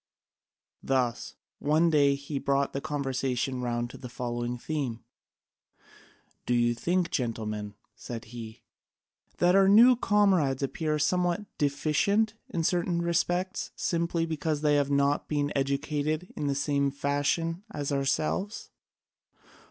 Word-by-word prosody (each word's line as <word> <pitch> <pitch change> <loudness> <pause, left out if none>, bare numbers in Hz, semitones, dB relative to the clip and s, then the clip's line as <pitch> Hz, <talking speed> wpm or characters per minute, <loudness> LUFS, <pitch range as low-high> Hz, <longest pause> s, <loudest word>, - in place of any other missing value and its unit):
Thus 125 -3 -1 0.2
one 155 +3 +3
day 140 -2 +4
he 140 0 -5
brought 140 0 0
the 135 - -3
conversation 135 -3 -2
round 120 -1 -2
to - - -11
the 125 - -8
following 120 0 -3
theme: 130 -4 -3 1.4
"Do 125 - +2
you 120 0 +3
think, 175 +7 0
gentlemen," 105 -4 -3 0.2
said 115 -2 -7
he, 110 -2 -9 0.7
"that 175 0 +4
our 195 0 +5
new 235 +5 +8
comrades 190 - +2
appear 155 +2 -1
somewhat 180 +5 +1
deficient 155 +10 +1 0.2
in 165 - -2
certain 175 0 0
respects 175 +2 0
simply 170 -1 0
because 160 -2 -2
they 150 -1 +3
have 145 -1 +2
not 140 0 +1
been 145 -1 0
educated 145 +4 -1
in 145 - -2
the 140 - 0
same 140 0 +1
fashion 145 +5 -1
as 145 -1 -4
ourselves? 155 +9 -1
145 Hz, 125 wpm, -28 LUFS, 135-170 Hz, 1.4 s, new